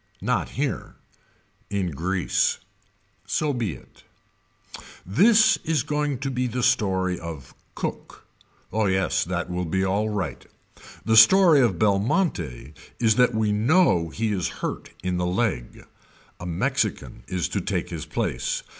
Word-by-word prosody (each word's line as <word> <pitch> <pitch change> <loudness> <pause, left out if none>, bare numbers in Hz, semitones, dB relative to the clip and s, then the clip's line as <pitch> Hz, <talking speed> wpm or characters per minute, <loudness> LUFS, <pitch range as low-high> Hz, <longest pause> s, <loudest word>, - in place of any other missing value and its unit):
Not - - 0
here. - - -3 0.7
In 95 -4 -1
Greece. 90 +5 0 0.7
So 150 -2 0
be 115 - -2
it. 65 - -16 1.0
This 215 - +5
is 155 -5 0
going 150 -2 -1
to 135 - -2
be 125 0 -1
the 125 +1 -3
story 95 -7 +1
of 80 -6 -8 0.2
Cook. - - -6 0.5
Oh 110 -1 +1
yes 95 -1 +1
that 90 0 -3
will 90 0 -2
be 95 +4 0
alright. 100 - -2 0.6
The 110 - +3
story 160 - +7
of 110 -8 +2
Belmonte 100 - 0 0.3
is 110 -2 +4
that 125 -2 +3
we 110 -1 +1
know 110 - +3
he 110 +6 -2
is 95 -5 -1 0.2
hurt - - -4
in 90 -1 -1
the 90 0 -1
leg. 90 - -2 0.5
A 85 - -6
Mexican 85 -1 -2
is 90 -3 -1
to - - -2
take - - -3
his - - -6
place. - - -2
100 Hz, 135 wpm, -24 LUFS, 90-125 Hz, 1.0 s, story